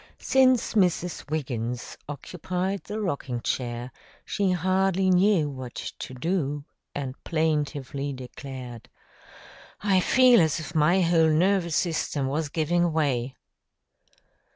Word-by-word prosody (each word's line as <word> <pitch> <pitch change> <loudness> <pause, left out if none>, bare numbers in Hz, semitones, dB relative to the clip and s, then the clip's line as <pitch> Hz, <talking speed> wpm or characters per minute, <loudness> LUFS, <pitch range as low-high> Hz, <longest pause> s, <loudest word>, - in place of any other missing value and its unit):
Since 260 -2 +3
Mrs. 180 -6 0
Wiggins 125 -6 -3
occupied 180 +6 -4
the 210 +1 -4
rocking 140 - -2
chair, 120 0 -3 0.3
she 200 -2 0
hardly 185 +1 +2
knew 185 -3 +4
what 130 -4 -7
to 130 - -7
do 145 -1 -1 0.3
and 135 -3 -3
plaintively 145 -3 -1
declared, 130 -2 -8 0.9
"I 195 -2 +3
feel 250 +4 +6
as 160 0 +1
if 155 -1 -7
my 170 +4 +4
whole 165 -2 +4
nervous 170 +1 +2
system 155 -5 0
was 145 +3 -1
giving 175 +3 +1
way." 135 -5 0
160 Hz, 110 wpm, -26 LUFS, 135-185 Hz, 0.9 s, feel